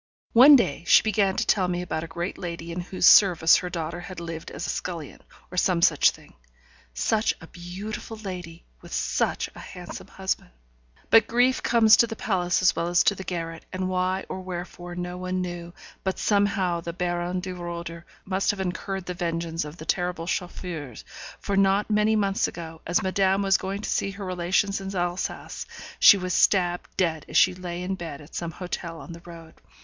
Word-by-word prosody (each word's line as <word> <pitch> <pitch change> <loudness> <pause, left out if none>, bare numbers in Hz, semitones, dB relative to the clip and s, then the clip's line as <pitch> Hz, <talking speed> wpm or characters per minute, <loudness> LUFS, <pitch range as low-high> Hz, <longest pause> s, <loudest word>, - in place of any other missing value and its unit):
One 270 +5 +9
day 165 - +1
she - - +7
began 205 -3 +1
to - - 0
tell 185 -3 +2
me 180 0 -2
about 160 -2 -3
a - - -6
great 170 +2 -4
lady 170 -1 -5
in 170 - -4
whose 180 0 -1
service 175 -5 +7
her 180 - -4
daughter 170 0 -4
had 180 0 -8
lived 165 -1 -6
as - - -6
scullion, 165 -5 -5 0.3
or 180 - -7
some 175 -2 +2
such - - +5
thing. - - -13 0.6
Such 215 - +1
a - - -11
beautiful 190 +6 -7
lady! 180 -5 -8 0.2
with - - -13
such - - 0
a - - -12
handsome - - -9
husband. - - -3 0.6
But 225 -1 +7
grief 250 +2 +2
comes 225 -2 +6
to 235 - +4
the 225 - -6
palace 180 -4 0
as 180 - +5
well 170 0 -1
as 175 0 +3
to - - +4
the 190 - -7
garret, 165 -3 -5
and 185 0 -2
why 185 +1 0
or 185 - -5
wherefore 175 -1 -7
no 180 0 -5
one 185 0 -2
knew, 175 -1 -5 0.3
but 190 -1 -1
somehow 200 -4 +1
the 170 0 -5
Baron 175 0 -2
de 185 0 -5
Roeder 170 -1 -6 0.2
must 190 0 0
have 205 - 0
incurred 190 0 -3
the 180 - -4
vengeance 165 -1 -2
of 150 +3 -9
the 155 - -9
terrible 175 -1 -1
Chauffeurs; 170 - -5 0.3
for 200 - -2
not 195 +2 +3
many 210 +1 +3
months 200 -2 +1
ago, 160 -1 -8
as 175 +4 +1
madame 190 +1 +2
was 195 -1 +4
going 195 +2 -4
to - - -3
see - - 0
her 200 0 -7
relations 185 +2 0
in 195 0 -6
Alsace, 175 0 -3 0.3
she 200 - +9
was 185 -1 -3
stabbed 175 -3 +2
dead 160 -4 0
as - - 0
she 185 - +6
lay 180 -1 -6
in 190 +1 -2
bed 165 -6 -6
at 150 +1 -15
some 170 - -3
hotel 170 -1 -6
on - - -10
the 170 - -11
road. 165 -2 -11
180 Hz, 195 wpm, -25 LUFS, 170-195 Hz, 0.6 s, One